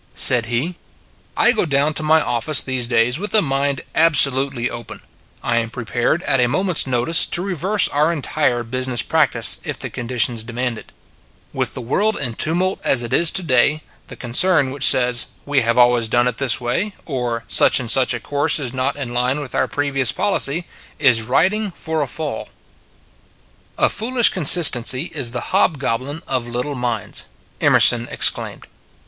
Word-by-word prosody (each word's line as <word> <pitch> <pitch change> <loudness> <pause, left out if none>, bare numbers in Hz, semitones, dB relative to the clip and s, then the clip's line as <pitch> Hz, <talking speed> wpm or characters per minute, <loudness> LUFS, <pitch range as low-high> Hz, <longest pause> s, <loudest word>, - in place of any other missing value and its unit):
Said 120 -3 +6
he: 135 +10 -3 0.3
" - - -34
I 240 - +4
go 220 - -1
down 145 -1 0
to 155 - +2
my 155 0 +2
office 120 +5 +1
these 130 -2 -3
days 120 +3 0
with 205 +2 -6
my 215 - +6
mind 140 -2 -2
absolutely 140 -5 +2
open; 120 -2 -9 0.4
I 120 -1 -1
am 115 -1 -1
prepared 120 +7 -3
at 135 - 0
a 125 - +2
moment 180 +6 -1
s - - +3
notice 125 +6 +3
to 175 - -1
reverse 195 +2 0
our 150 +3 0
entire 145 -5 -2
business 130 0 -1
practice, - - 0
if - - -6
the - - -7
conditions 120 -1 -1
demand 120 0 -4
it. - - -17 0.6
With - - -3
the - - -6
world 210 - -1
in 125 -4 -4
tumult 175 +9 -2
as 120 -3 +1
it 120 - -6
is 170 -1 +5
to 185 - 0
day, 145 +1 +1 0.2
the - - -10
concern 140 +3 +1
which 140 0 +1
says, 125 -1 +3 0.2
We 145 -1 0
have 115 +1 -1
al 120 0 +5
ways 115 -2 -1
done 120 +2 +1
it 125 -2 -4
this 135 -4 +2
way, 130 +13 -3
or 120 -5 -4
Such - - +4
and 120 -3 -2
such 130 -1 +3
a - - -5
course 145 +4 0
is 130 -6 -5
not 130 +2 -2
in 135 -4 -7
line 125 +3 -1
with 145 -4 -8
our 130 - 0
previous 135 -3 -2
policy, 175 -4 -1 0.3
is 125 -7 +3
riding 195 - 0
for 160 -1 -4
a 145 - -2
fall. 150 -3 -6 0.7
" - - -36 0.5
A - - +2
foolish 240 +2 +2
consistency 140 -7 +4
is 120 - -1
the 125 0 -6
hobgoblin 140 +3 -1
of 130 -3 -3
little 125 +4 -4
minds," 120 -5 -4 0.4
Emerson 120 0 +3
exclaimed. - - 0
130 Hz, 180 wpm, -18 LUFS, 120-155 Hz, 0.7 s, Said